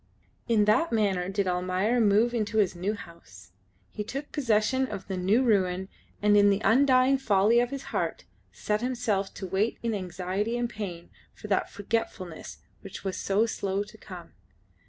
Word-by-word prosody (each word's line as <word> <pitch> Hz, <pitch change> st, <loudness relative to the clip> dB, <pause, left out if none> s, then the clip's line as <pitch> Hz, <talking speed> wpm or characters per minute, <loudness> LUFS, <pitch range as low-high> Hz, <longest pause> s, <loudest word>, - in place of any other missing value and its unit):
In 220 Hz, -3 st, +3 dB
that 215 Hz, +11 st, +3 dB
manner 195 Hz, -5 st, +1 dB
did 195 Hz, 0 st, -1 dB
Almayer 185 Hz, +6 st, +1 dB
move 220 Hz, +3 st, +3 dB
into 220 Hz, -2 st, -1 dB
his 195 Hz, -4 st, +2 dB
new 195 Hz, +5 st, -2 dB
house. 105 Hz, -, -14 dB, 0.4 s
He 210 Hz, -, -4 dB
took 275 Hz, +7 st, -6 dB
possession 260 Hz, 0 st, +1 dB
of 195 Hz, -, -7 dB
the 190 Hz, -, -3 dB
new 195 Hz, +8 st, +2 dB
ruin, 190 Hz, -5 st, +1 dB, 0.3 s
and 210 Hz, 0 st, +5 dB
in 205 Hz, 0 st, +6 dB
the 200 Hz, 0 st, +2 dB
undying 260 Hz, +2 st, +4 dB
folly 215 Hz, -1 st, +3 dB
of 240 Hz, 0 st, +1 dB
his 275 Hz, -1 st, -6 dB
heart -, -, -2 dB, 0.3 s
set 210 Hz, +1 st, -2 dB
himself 235 Hz, -6 st, -1 dB
to 195 Hz, -, -6 dB
wait 195 Hz, +5 st, 0 dB
in 230 Hz, -1 st, 0 dB
anxiety 190 Hz, +4 st, -2 dB
and 240 Hz, 0 st, 0 dB
pain 190 Hz, -7 st, -7 dB, 0.2 s
for -, -, -10 dB
that 195 Hz, -, +1 dB
forgetfulness 200 Hz, -5 st, -4 dB, 0.2 s
which 195 Hz, -1 st, -9 dB
was 190 Hz, -1 st, -3 dB
so 200 Hz, +3 st, +1 dB
slow 200 Hz, -3 st, -2 dB
to 205 Hz, -, -15 dB
come. -, -, -11 dB
205 Hz, 170 wpm, -27 LUFS, 190-230 Hz, 0.4 s, in